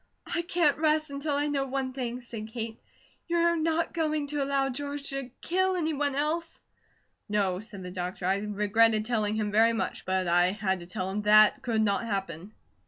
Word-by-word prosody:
"I 340 - -1
can't 335 -4 +1
rest 310 -1 +2
until 280 +1 -2
I 290 +1 +1
know 280 -2 -1
one 265 -1 -2
thing," 250 -1 -4
said 230 -3 -7
Kate. 225 0 -5 0.5
"You're 340 0 +2
not 330 +1 0
going 310 -3 0
to 295 -1 0
allow 275 0 +1
George 285 +2 -4
to 275 -2 -4
kill 375 +2 +1
any 320 -3 0
one 285 -1 0
else?" 320 +3 -1 0.7
"No," 195 -3 +1
said 205 -3 -9
the 180 - -7
doctor. 180 0 -4
"I 190 +2 +2
regretted 210 +2 +2
telling 215 -3 0
him 210 -1 -1
very 225 +2 +4
much; 225 - -3
but 185 -1 0
I 175 +2 +3
had 190 -3 -1
to 175 - -10
tell 185 +1 -3
him 210 +2 -2
THAT 215 0 +6
could 225 -3 +1
not 200 -2 +1
happen." 195 -4 -4
235 Hz, 190 wpm, -28 LUFS, 205-295 Hz, 0.7 s, THAT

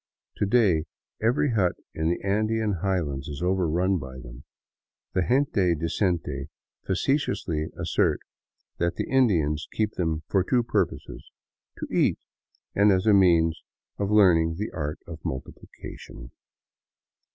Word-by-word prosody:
To 100 - 0
day 100 -8 +3 0.4
every 120 +5 +2
hut 95 -6 +2 0.2
in 80 +1 -1
the 85 - 0
Andean 110 0 0
highlands 80 -9 -1
is 75 +3 -6
overrun 90 0 +1
by 65 -2 -8
them. - - -11 0.7
The 95 - +2
gente 105 -6 +2
decente 80 -4 -1 0.4
facetiously 95 - 0
assert - - +1 0.6
that 85 0 0
the - - -3
Indians 85 - +2
keep 110 -1 0
them 80 -3 -1
for 95 -2 +2
two 120 +5 +2
purposes, 115 - -2 0.3
— - - -57
to - - -3
eat, - - +2 0.6
and 100 +1 +4
as 95 +1 +2
a 110 - +5
means 85 -4 +4 0.4
of 100 -1 -1
learning 85 -6 +4
the 105 +3 -3
art 75 -2 -4
of 85 -2 -10
multiplication. 65 -2 -8
90 Hz, 130 wpm, -26 LUFS, 80-105 Hz, 0.7 s, a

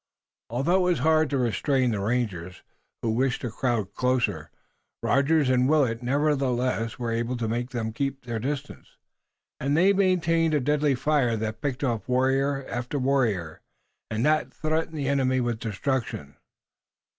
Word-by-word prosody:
Although 135 - +1
it 180 -1 +2
was 175 - +1
hard 160 -1 +4
to 140 - 0
restrain 125 +2 +1
the 105 - -1
rangers, 100 -5 -2 0.4
who 115 - +1
wished 125 +3 0
to 120 - -3
crowd 110 -4 -1
closer, 120 -12 0 0.5
Rogers 145 +1 +3
and 130 0 +3
Willet 130 -7 +2
nevertheless 130 -3 0
were 120 -2 -3
able 120 +2 -1
to 115 -2 -2
make 120 +2 -2
them 115 -3 -3
keep 135 +1 -3
their 115 -2 -3
distance, 140 +4 -5 0.6
and 140 +3 0
they 190 +4 +5
maintained 165 -4 +2
a - - +3
deadly 145 +1 +1
fire 130 -4 +1
that 110 0 -4
picked 140 -2 -2
off 120 -3 -2
warrior 135 +2 +1
after 125 +4 -4
warrior 115 - 0 0.5
and 110 +2 -1
that 155 0 +2
threatened 160 +1 -2
the 140 -2 -2
enemy 130 -2 +2
with 120 -2 -1
destruction. 110 - -3
130 Hz, 155 wpm, -26 LUFS, 115-145 Hz, 0.6 s, they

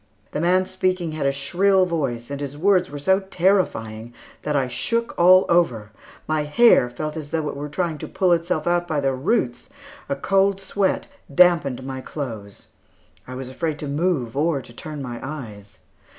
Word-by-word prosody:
The 150 - -2
man 185 +2 +3
speaking 185 -2 -1
had 155 -3 -1
a - - +3
shrill 185 +8 +2
voice, 140 -8 -3
and 140 0 -4
his 140 0 -5
words 185 +1 +3
were 145 - -7
so 190 +7 +2
terrifying 170 - 0 0.3
that 150 - -2
I 135 -2 +1
shook 230 - -1
all 185 +2 +6
over; 125 -12 +1 0.4
my 155 -1 +1
hair 150 - +5
felt 150 +5 -5
as 155 -3 -6
though 160 -1 -1
it - - -6
were 145 +1 -5
trying 165 -1 -2
to - - -6
pull 185 -2 +1
itself 170 -2 -1
out 175 0 +1
by 155 - -1
its 140 - -1
roots; 135 - 0 0.4
a - - 0
cold 195 +5 +2
sweat 195 0 -1 0.3
dampened 145 -6 +3
my 130 0 -5
clothes. 110 -9 -7 0.6
I 130 - -7
was 130 0 -6
afraid 150 +4 -3
to 150 - -6
move 145 -5 -1
or 155 0 +1
to 120 -2 -13
turn 150 +3 -7
my 120 -2 -6
eyes. 110 -9 -8
150 Hz, 180 wpm, -22 LUFS, 130-180 Hz, 0.6 s, all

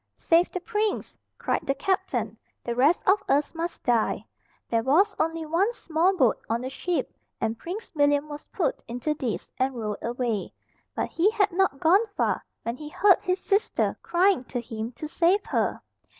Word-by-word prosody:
"Save 340 +2 +3
the 365 - -3
prince," 420 +3 -2 0.2
cried - - -1
the 275 - +1
captain, 380 +4 -1 0.3
"the 235 - -2
rest 280 +8 +3
of 395 +2 +5
us 290 +2 +2
must 335 +1 -4
die!" 235 -3 +1 0.4
There 230 -1 +1
was 340 - +3
only 325 0 0
one 345 +8 +2
small 360 -1 +1
boat 255 -8 +4
on 230 +1 0
the 260 +1 -4
ship, 355 +5 -2 0.3
and 225 0 -1
Prince 385 - -7
William 290 -1 +2
was 295 0 -9
put 335 - -1
into 245 +6 -2
this, 255 -7 -4
and 260 0 +1
rowed 215 -3 -4
away. 235 -4 -2 0.4
But - - -2
he 355 +5 +3
had 420 -3 +1
not 355 -6 +1
gone 385 +8 +4
far, - - +1 0.2
when 230 +2 -3
he 300 +1 -8
heard 390 +4 +5
his 365 0 0
sister 405 +1 +1
crying 360 -4 +2
to 245 - -4
him 225 -1 -5
to 305 - -6
save 355 +6 +2
her. - - 0
315 Hz, 180 wpm, -26 LUFS, 250-375 Hz, 0.4 s, of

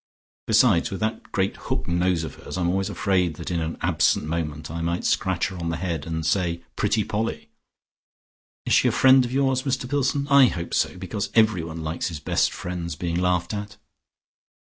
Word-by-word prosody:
Besides 110 -5 +4
with 95 - -5
that 110 +1 -3
great 95 -1 0
hook - - -4
nose 85 -1 +1
of 80 - -6
hers, - - -8
I'm 85 -1 +1
always 95 +2 0
afraid 90 -5 0
that 85 +2 -6
in 85 - 0
an 80 0 -3
absent - - +2
moment 75 -2 -4
I 85 0 -4
might 85 +1 -2
scratch 95 -2 +1
her 95 - -8
on 85 -1 -3
the 80 - -2
head 85 -4 -3
and 80 -1 -3
say 85 0 0
'Pretty 105 +1 +1
Polly.' 110 +3 -3 1.2
Is - - +1
she - - +5
a - - +5
great - - -3
friend 130 -1 +7
of 120 - -5
yours, 135 -1 +1
Mr 130 -2 -2
Pillson? 140 +1 0
I 140 -2 +7
hope 85 -6 -4
so, - - 0
because 95 +3 -4
everyone 85 -8 +2
likes 80 +2 -2
his 80 -4 -5
best - - +1
friends 85 -2 -5
being 85 +2 -2
laughed 90 0 0
at." 100 -1 -6
90 Hz, 195 wpm, -24 LUFS, 85-110 Hz, 1.2 s, friend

